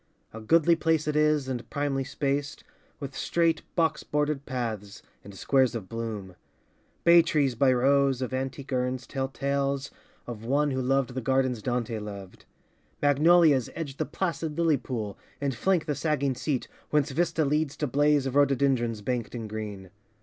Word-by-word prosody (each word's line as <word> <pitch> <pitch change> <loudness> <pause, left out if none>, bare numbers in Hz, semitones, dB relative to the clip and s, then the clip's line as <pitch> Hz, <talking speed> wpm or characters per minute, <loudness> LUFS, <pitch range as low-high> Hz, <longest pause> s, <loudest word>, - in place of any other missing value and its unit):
A 110 - -7
goodly 165 +8 +4
place 160 -2 +1
it 150 - 0
is 150 -2 +2
and 125 -2 -4
primly 140 -2 -1
spaced, 140 +1 -2 0.4
With 140 -2 -7
straight 165 -2 +1
box 165 -2 +1
bordered 150 -1 -1
paths 110 -5 -4 0.2
and 100 -1 -11
squares 130 +3 +2
of 105 -5 -5
bloom. 110 -5 -5 0.7
Bay 170 0 +8
trees 145 -5 +1
by 130 +3 +3
rows 135 +1 +3
of 130 -1 -3
antique 135 +1 -4
urns 125 0 -1
tell 135 -1 -3
tales 140 0 -2 0.3
Of 115 -3 -7
one 145 +4 +1
who 130 0 -1
loved 130 -1 +1
the 130 - -3
gardens 130 -2 +1
Dante 120 -2 -2
loved. 100 -3 -9 0.5
Magnolias 145 -1 +4
edge 145 -5 -5
the - - -1
placid 165 -4 -3
lily 165 -3 +3
pool 115 -6 -5 0.2
And 140 -1 -1
flank 180 +6 +1
the 150 - -1
sagging 140 -3 0
seat, 130 +1 -2 0.2
whence 150 -1 +1
vista 160 +1 +1
leads 150 0 0
To 150 - -1
blaze 145 +1 +2
of 135 0 -3
rhododendrons 130 -5 +2
banked 125 0 -3
in 115 -2 -5
green. 105 -3 -6
135 Hz, 165 wpm, -27 LUFS, 120-150 Hz, 0.7 s, Bay